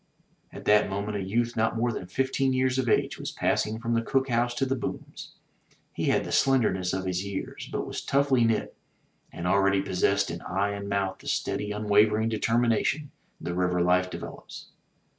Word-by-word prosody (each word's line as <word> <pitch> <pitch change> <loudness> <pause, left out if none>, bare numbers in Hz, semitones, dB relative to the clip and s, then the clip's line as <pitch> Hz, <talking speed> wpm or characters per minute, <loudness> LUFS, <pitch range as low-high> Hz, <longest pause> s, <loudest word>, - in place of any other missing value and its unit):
'* - - -39
At - - -10
that 105 0 +4
moment 100 +2 -3
a - - -3
youth 115 +5 -1
not 110 0 +1
more 120 +1 +1
than 90 - -6
fifteen 135 +5 0
years 130 0 +1
of 125 -3 0
age - - +1
was - - -4
passing 110 +1 0
from 115 0 -2
the 115 - +2
cook 135 +3 0
house 120 0 +1
to 135 - +1
the 135 0 0
booms. 125 - -6 0.6
He - - -2
had - - +2
the - - -6
slender 130 -7 +3
ness 90 -1 -2
of 95 0 -2
his 90 0 -1
years, 100 -1 -6
but - - -2
was - - -5
toughly 135 -3 +2
knit, 115 -1 0 0.6
and 85 - -6
already 100 +1 +3
possessed 100 0 +1
in 85 0 -6
eye 100 +3 -1
and 100 0 -5
mouth 100 -1 -1
the - - -13
steady 105 - -1
unwavering 105 +1 +3
determination 115 +6 +1 0.3
the 85 - -4
river 90 0 +1
life 90 +1 +3
develops. - - -9
105 Hz, 195 wpm, -27 LUFS, 95-120 Hz, 0.6 s, that